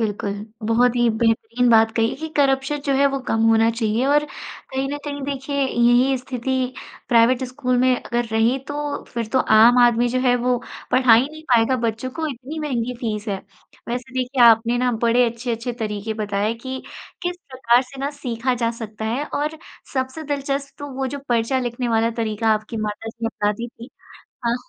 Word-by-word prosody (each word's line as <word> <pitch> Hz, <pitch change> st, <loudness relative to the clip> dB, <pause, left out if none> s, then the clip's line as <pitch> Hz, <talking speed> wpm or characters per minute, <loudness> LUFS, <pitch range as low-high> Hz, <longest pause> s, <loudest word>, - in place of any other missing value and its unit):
बिल्कुल, 205 Hz, -2 st, -2 dB, 0.3 s
बहुत 245 Hz, +2 st, +3 dB
ही 240 Hz, -1 st, +3 dB
बेहतरीन 225 Hz, +2 st, +1 dB
बात 225 Hz, 0 st, +5 dB
कही 225 Hz, +1 st, +2 dB
कि 320 Hz, +2 st, -5 dB
करप्शन 275 Hz, +1 st, +2 dB
जो 275 Hz, -, +2 dB
है 280 Hz, +1 st, +4 dB
वो -, -, 0 dB
कम 225 Hz, -, +1 dB
होना 225 Hz, 0 st, +4 dB
चाहिए 230 Hz, +1 st, 0 dB
और 295 Hz, +1 st, +3 dB
कहीं 270 Hz, -2 st, -6 dB
न 290 Hz, -, -3 dB
कहीं 285 Hz, -1 st, -5 dB
देखिए, 280 Hz, 0 st, -4 dB
यही 245 Hz, +2 st, +3 dB
स्थिति 255 Hz, 0 st, -2 dB, 0.4 s
प्राइवेट 240 Hz, +2 st, +4 dB
स्कूल 250 Hz, 0 st, -1 dB
में 255 Hz, 0 st, +4 dB
अगर 240 Hz, 0 st, -1 dB
रही 225 Hz, +4 st, +2 dB
तो, 290 Hz, 0 st, -3 dB
फिर 235 Hz, -2 st, -4 dB
तो 260 Hz, -, +4 dB
आम 230 Hz, +2 st, +6 dB
आदमी 240 Hz, 0 st, +3 dB
जो 255 Hz, +1 st, 0 dB
है 250 Hz, -1 st, +3 dB
वो 245 Hz, +1 st, +1 dB, 0.3 s
पढ़ा 255 Hz, -2 st, +6 dB
ही 250 Hz, +5 st, +3 dB
नहीं 310 Hz, 0 st, -11 dB
पाएगा 235 Hz, +2 st, +4 dB
बच्चों 225 Hz, +3 st, -2 dB
को, 315 Hz, +4 st, -3 dB
इतनी 275 Hz, +3 st, -6 dB
महँगी 250 Hz, -5 st, -2 dB
फ़ीस 215 Hz, -2 st, -3 dB
है। 195 Hz, -, -1 dB, 0.5 s
वैसे 250 Hz, +1 st, -4 dB
देखिए, 255 Hz, 0 st, +1 dB
आपने 230 Hz, +1 st, +5 dB
ना 250 Hz, 0 st, +2 dB
बड़े 240 Hz, +1 st, +4 dB
अच्छे-अच्छे 235 Hz, 0 st, -4 dB
तरीके 220 Hz, -2 st, -4 dB
बताए 210 Hz, +1 st, -1 dB
कि 260 Hz, +3 st, -6 dB, 0.4 s
किस 355 Hz, 0 st, -2 dB
प्रकार 255 Hz, -1 st, +3 dB
से 265 Hz, +1 st, -11 dB
ना 280 Hz, +1 st, -1 dB
सीखा 245 Hz, 0 st, -1 dB
जा 230 Hz, -1 st, 0 dB
सकता 220 Hz, -2 st, -7 dB
है 245 Hz, +7 st, -1 dB
और 300 Hz, +2 st, -2 dB, 0.4 s
सबसे 260 Hz, +4 st, -2 dB
दिलचस्प 280 Hz, -1 st, -3 dB
तो 285 Hz, 0 st, -6 dB
वो 265 Hz, 0 st, -2 dB
जो 285 Hz, +2 st, -5 dB
पर्चा 240 Hz, +2 st, +1 dB
लिखने 240 Hz, -1 st, -2 dB
वाला 225 Hz, 0 st, +2 dB
तरीका 220 Hz, 0 st, -1 dB
आपकी 215 Hz, +2 st, -5 dB
माता 215 Hz, +1 st, -4 dB
जी 230 Hz, 0 st, -5 dB
अपनाती 210 Hz, +1 st, -2 dB
थी। 235 Hz, +2 st, -12 dB, 0.6 s
हाँ, 235 Hz, -, +2 dB
245 Hz, 185 wpm, -22 LUFS, 225-265 Hz, 0.6 s, आम